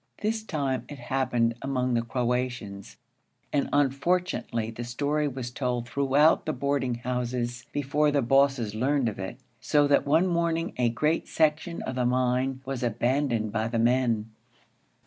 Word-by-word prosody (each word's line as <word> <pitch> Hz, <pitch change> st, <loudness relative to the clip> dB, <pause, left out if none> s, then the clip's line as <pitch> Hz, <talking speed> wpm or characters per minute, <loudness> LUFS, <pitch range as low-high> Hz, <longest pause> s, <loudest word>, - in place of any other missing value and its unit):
This 220 Hz, +1 st, 0 dB
time 140 Hz, -10 st, -2 dB
it 145 Hz, -, -7 dB
happened 120 Hz, -2 st, 0 dB
among 130 Hz, -2 st, -1 dB
the 115 Hz, -, +2 dB
Croatians, 120 Hz, -4 st, -3 dB, 0.6 s
and, 140 Hz, -2 st, +1 dB
unfortunately, 140 Hz, -, 0 dB
the 115 Hz, +1 st, -6 dB
story 145 Hz, +5 st, -1 dB
was 130 Hz, -3 st, -5 dB
told 125 Hz, -2 st, -2 dB
throughout 140 Hz, +5 st, +3 dB
the 155 Hz, -, 0 dB
boarding 140 Hz, -2 st, -1 dB
houses 120 Hz, 0 st, -3 dB
before 145 Hz, +1 st, +1 dB
the 140 Hz, -2 st, +1 dB
bosses 135 Hz, -3 st, +2 dB
learned 130 Hz, +3 st, +1 dB
of 105 Hz, -3 st, -4 dB
it, 95 Hz, 0 st, -5 dB, 0.2 s
so 145 Hz, -1 st, +3 dB
that 145 Hz, 0 st, +3 dB
one 160 Hz, +5 st, +4 dB
morning 170 Hz, -1 st, 0 dB
a 125 Hz, -1 st, +2 dB
great 150 Hz, +8 st, 0 dB
section 160 Hz, +2 st, 0 dB
of 130 Hz, -, -4 dB
the 125 Hz, -1 st, 0 dB
mine 130 Hz, +1 st, 0 dB
was 135 Hz, -2 st, -4 dB
abandoned 120 Hz, -1 st, 0 dB
by 110 Hz, +1 st, -1 dB
the 115 Hz, 0 st, -2 dB
men. 115 Hz, -2 st, +1 dB
130 Hz, 150 wpm, -27 LUFS, 120-145 Hz, 0.6 s, one